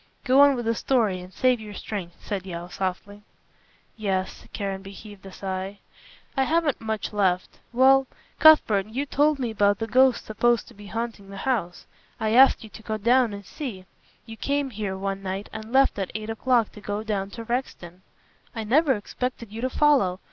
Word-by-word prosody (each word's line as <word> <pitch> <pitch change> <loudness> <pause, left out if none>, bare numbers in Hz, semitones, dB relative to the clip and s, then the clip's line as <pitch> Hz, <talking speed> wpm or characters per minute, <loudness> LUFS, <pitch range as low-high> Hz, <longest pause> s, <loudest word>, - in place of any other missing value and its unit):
"Go 270 +1 +5
on 285 -1 +6
with 240 -2 -4
the 230 - +2
story 225 -6 +1
and 180 +1 -11
save 255 +3 +2
your 210 -1 -9
strength," 190 -5 -6
said 200 -3 -3
Yeo 175 -2 -7
softly. 195 +3 -4 0.7
"Yes." 190 -4 -3
Caranby 195 -1 -5
heaved 205 -1 -12
a - - -10
sigh. 190 +1 -5 0.6
"I 270 - +2
haven't 320 -2 +1
much 220 -1 -3
left. 185 -3 0
Well, 265 +2 +5 0.3
Cuthbert, 220 -11 +6
you 255 +6 -3
told 290 +1 +2
me 245 -4 -2
about 205 -1 +2
the 225 - -3
ghosts 255 +2 +3
supposed 235 +2 +1
to - - -15
be 205 0 -13
haunting 225 -3 -5
the 195 - -9
house. 215 -10 -1 0.3
I 220 -1 0
asked 265 0 +6
you 220 - -10
to - - -11
go 220 0 -3
down 240 +2 +3
and 200 -1 -8
see. 210 - -7 0.4
You 225 -1 -10
came 280 +1 -1
here 200 -3 -4
one 195 0 -3
night 195 +1 -5
and 220 +1 -7
left 270 -4 +3
at 190 - -2
eight 215 0 -4
o'clock 235 0 +1
to 210 - -13
go 205 +1 -3
down 200 -3 -2
to 230 - -5
Rexton." 205 -8 -4 0.5
"I 225 - -3
never 270 +6 +3
expected 235 +1 -5
you 225 +2 -6
to 255 - 0
follow. 255 -11 +3
220 Hz, 190 wpm, -25 LUFS, 195-255 Hz, 0.7 s, on